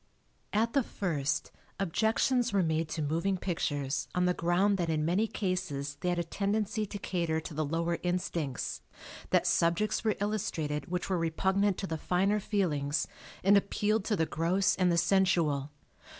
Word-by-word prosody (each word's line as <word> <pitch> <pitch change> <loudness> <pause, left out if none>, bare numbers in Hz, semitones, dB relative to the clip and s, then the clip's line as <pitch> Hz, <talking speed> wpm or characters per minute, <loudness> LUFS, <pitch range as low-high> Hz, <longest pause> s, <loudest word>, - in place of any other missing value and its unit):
At 225 +2 +1
the 275 - +4
first, 155 - -2 0.3
objections 225 +6 +1
were 195 -2 +2
made 160 -1 0
to 155 0 -2
moving 170 +6 0
pictures 145 -6 -2
on 180 0 +2
the 180 - +3
ground 185 +4 +2
that 170 -2 0
in 155 -1 +1
many 190 +7 +2
cases 175 -9 -3
they 180 - 0
had 175 - 0
a 170 - +1
tendency 210 +4 -1
to 205 - -6
cater 170 -5 -1
to 160 +1 -8
the 155 +1 -1
lower 165 +3 -1
instincts, 170 -7 -2 0.5
that - - +3
subjects 175 +7 +2
were 215 -2 +2
illustrated 160 -8 -2
which 180 0 -2
were 185 -2 0
repugnant 190 +4 +1
to - - -3
the 160 -4 -4
finer 195 +6 +1
feelings 150 -9 0 0.4
and 195 +2 +6
appealed 210 +1 +1
to 215 - +1
the 160 - +1
gross 185 +5 +1
and 180 -1 +2
the 170 - +2
sensual. 170 -6 +2
180 Hz, 165 wpm, -30 LUFS, 160-200 Hz, 0.5 s, and